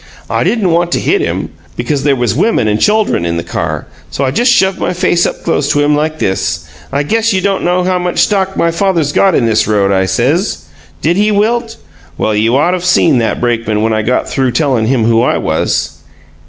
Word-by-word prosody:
"I - - +1
didn't 210 -7 +1
want 170 +1 +1
to - - +1
hit 390 +1 +1
him, 395 - -2 0.3
because 145 -3 -2
there 140 -1 +2
was 120 -3 0
women 150 - +1
and 105 0 0
chuldren 210 - +1
in 85 0 -2
the 85 - -3
car, - - -4 0.2
so 140 - -2
I 130 - 0
just 240 - +2
shoved 190 -5 +2
my - - -1
face 175 -1 +1
up - - -6
close 145 -4 0
to 145 - +1
him, 145 0 +2
like 155 +1 -1
this. 85 - -2 0.2
'I 140 +2 0
guess 225 +7 0
you 190 - +1
don't 195 0 -1
know 180 +1 +1
how 180 0 0
much 180 0 -3
stock 195 -2 0
my 170 - +2
father's 170 -4 0
got 190 +3 +2
in 120 - +2
this 110 -1 +1
road,' 100 -2 +1
I 95 -1 +1
says. 130 - 0 0.4
Did 170 +4 +1
he 210 +1 +2
wilt? 225 +3 0 0.4
Well, 110 - 0
you 115 +4 +2
ought 170 +5 +2
of 180 -1 -3
seen 170 -6 +3
that 115 - -1
brakeman 115 -3 -1
when 110 0 +1
I 110 - 0
got 125 +4 -1
through 130 -3 -1
tellin' 125 -5 +1
him 125 -2 +1
who 115 0 +3
I 125 - +1
was!" - - -2
150 Hz, 225 wpm, -13 LUFS, 115-190 Hz, 0.4 s, seen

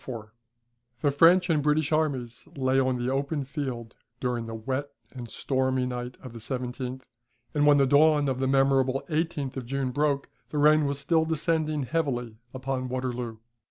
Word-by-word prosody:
137.] 115 -3 -8 0.7
The 140 - +1
French 175 +4 +6
and 160 -4 +2
British 150 +1 +1
armies 135 -7 -1
lay 130 -1 +2
on 130 -1 +2
the 125 +1 -1
open 140 +2 -1
field 130 -5 -5 0.3
during 120 -2 -2
the 115 - -5
wet 130 +5 -3 0.2
and 120 -3 -8
stormy 130 +2 0
night 125 0 -5
of 130 -3 -9
the 115 - -8
17th; 125 +1 -4 0.5
and 145 0 +3
when 145 -1 +7
the 140 - +5
dawn 145 +1 +4
of 130 -1 -1
the 130 - +1
memorable 135 0 +2
18th 155 -4 -2
of 125 -3 -5
June 135 0 -1
broke, 140 0 0 0.2
the 150 - -4
rain 150 0 +5
was 140 0 -1
still 160 +3 +2
descending 160 -2 0
heavily 125 -7 -2
upon 130 0 -3
Waterloo. 125 -3 -3
135 Hz, 170 wpm, -27 LUFS, 125-150 Hz, 0.7 s, when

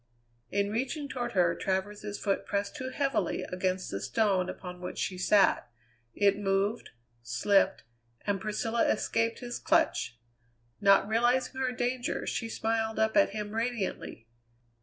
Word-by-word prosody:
In 200 +3 0
reaching 270 +6 -2
toward 240 -3 -4
her, 175 -3 +3
Travers's 205 +2 -2
foot 195 -1 0
pressed 200 +4 -2
too 260 -3 -4
heavily 270 - 0
against 185 0 -2
the 100 - -3
stone 195 -5 +1
upon 180 -1 -8
which 180 - -6
she 185 - -2
sat; 190 +2 +3 0.5
it 200 0 +3
moved, 200 +3 0 0.3
slipped, 125 - +2 0.4
and 200 -1 0
Priscilla 225 +2 0
escaped 230 +2 0
his 245 -1 -5
clutch. 325 - +1 0.6
Not 195 -1 +5
realizing 245 +4 +1
her 255 -1 +1
danger, 250 0 -2
she 230 - -2
smiled 225 0 -1
up 220 0 +2
at 300 - +5
him 210 0 -5
radiantly. 225 - -3
210 Hz, 140 wpm, -30 LUFS, 195-240 Hz, 0.6 s, Not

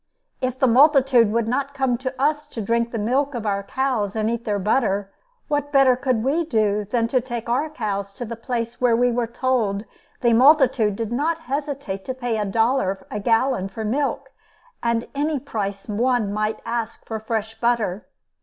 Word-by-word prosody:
If 255 0 -1
the 265 - +3
multitude 260 -3 +5
would 230 0 0
not 275 +3 -1
come 265 -3 +1
to 260 0 -3
us 295 +1 +1
to 245 - -8
drink 230 +2 0
the 235 - -4
milk 260 +6 0
of 230 -2 -4
our 200 -1 0
cows 230 -3 -1
and 220 0 0
eat 235 0 -4
their 210 -2 0
butter, 200 -1 0 0.3
what 290 -1 -1
better 270 -3 +5
could 255 -3 0
we 295 +6 +1
do 210 -7 +1
than 230 +3 0
to 255 0 +2
take 240 -2 -5
our 265 +6 0
cows 200 -8 -3
to 245 - -5
the 230 +1 -5
place 235 0 -4
where 245 -2 +4
we 245 +1 +3
were 240 -1 0
told 230 -4 0 0.4
the 235 -1 +4
multitude 255 -5 +5
did 225 +1 -4
not 320 +6 0
hesitate 280 -9 -4
to 260 - -4
pay 245 -3 -2
a 210 - 0
dollar 200 -2 0
a 210 - -3
gallon 225 -2 +1
for 220 +3 -5
milk 270 +3 -1 0.5
and 235 -1 0
any 295 +2 0
price 205 -7 -4
one 225 -1 +1
might 215 +1 -1
ask 230 -1 -4
for 220 -1 -4
fresh 220 0 -3
butter! 230 -5 0
235 Hz, 190 wpm, -22 LUFS, 215-265 Hz, 0.5 s, multitude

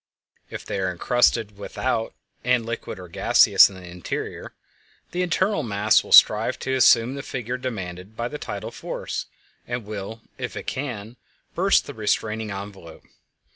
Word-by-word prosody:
If - - -7
they 100 - -3
are 95 -1 0
encrusted 105 +2 +1
without 115 +2 -2 0.3
and 125 -2 +2
liquid 115 -3 -5
or 90 -1 -10
gaseous 85 - +5
in 100 - -12
the 90 -1 -11
interior, 90 0 -6 0.6
the 180 - -2
internal 180 +1 +1
mass 105 -3 +2
will - - -13
strive - - +6
to 130 - -2
assume 125 -1 +5
the 140 - -5
figure 125 -2 -4
demanded 100 -5 -6
by 120 - -2
the 150 +4 -7
tidal - - -6
force, - - -5 0.4
and 120 -2 -4
will, 105 +2 -7 0.2
if - - -5
it - - -6
can, 120 -4 -5 0.4
burst 195 +3 +3
the 145 - -8
restraining 110 -1 -1
envelope. 100 -3 -8
110 Hz, 155 wpm, -24 LUFS, 100-125 Hz, 0.6 s, strive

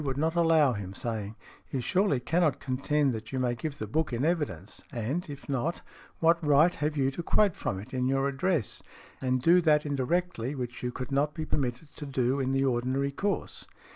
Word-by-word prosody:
would 135 -2 -2
not 160 +2 +1
allow 165 -5 +4
him, 100 -3 -6
saying, 110 -2 -4 0.3
"You 135 - -2
surely 180 - +2
cannot 155 0 +1
contend 140 +1 0
that 110 -1 -6
you 130 - -2
may 125 -2 +1
give 140 +5 -5
the 110 - -4
book 155 +9 -1
in 120 +4 0
evidence, 145 - -2
and 135 +8 -3
if 140 -1 -9
not, 140 +5 -2 0.4
what 165 +1 +3
right 150 +4 +5
have 150 +1 -2
you 135 -1 +2
to 155 - -5
quote 200 +2 +2
from 95 - -3
it 100 - -11
in 125 0 0
your 135 +1 +2
address, 140 - -1 0.4
and 130 -1 0
do 175 +4 +6
that 150 -2 +3
indirectly 145 -1 -1
which 125 -2 -5
you 125 - -2
would 130 +2 -5
not 145 +2 +1
be 160 -1 -3
permitted 135 +1 -3
to 145 - -6
do 130 0 0
in 130 -1 0
|103| - - 0
the 135 0 +2
ordinary 130 +2 0
course?" 200 +8 -3
140 Hz, 205 wpm, -29 LUFS, 125-155 Hz, 0.4 s, do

